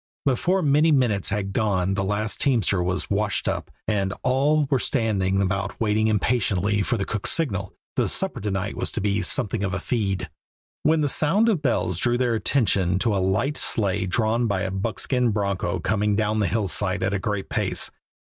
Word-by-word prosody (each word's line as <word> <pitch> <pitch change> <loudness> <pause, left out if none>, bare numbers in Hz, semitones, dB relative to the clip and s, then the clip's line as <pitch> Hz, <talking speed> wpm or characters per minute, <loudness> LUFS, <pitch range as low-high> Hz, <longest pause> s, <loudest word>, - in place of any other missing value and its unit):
Before 175 +8 +1
many 150 +2 +4
minutes 120 -9 +2
had 100 -1 -2
gone 95 -4 +1
the 100 0 -1
last 105 +2 -2
teamster 110 - +2
was 90 +2 -2
"washed 105 0 0
up," - - -2 0.2
and 100 -3 0
all 145 +4 +2
were 135 - +3
standing 95 -6 0
about 95 +1 -2
waiting 110 0 +1
impatiently 105 -2 +1
for 115 +4 0
the 100 - -2
cook's 105 -1 -2
signal 100 - -2 0.2
the - - +1
supper - - -1
to 105 - -2
night 95 +1 -2
was - - -3
to - - -2
be 105 0 0
"something 105 +1 0
of 95 -2 -1
a - - -2
feed" 95 -4 -2 0.5
when 155 +1 +3
the 145 - +2
sound 190 +11 +2
of 190 -9 +1
bells 90 - 0
drew 120 +3 +1
their 125 -2 +1
attention 100 -7 +1
to 105 +2 +1
a 95 - +1
light 115 +10 0
sleigh 95 -4 0
drawn 115 +4 +1
by 100 -2 -1
a 95 - -2
buckskin 115 +5 0
broncho 100 -4 -1
coming 105 +2 0
down 110 0 0
the 105 - +2
hillside 100 0 0
at 100 - 0
a 100 - 0
great 105 0 -3
pace. - - -1
105 Hz, 190 wpm, -24 LUFS, 95-120 Hz, 0.5 s, many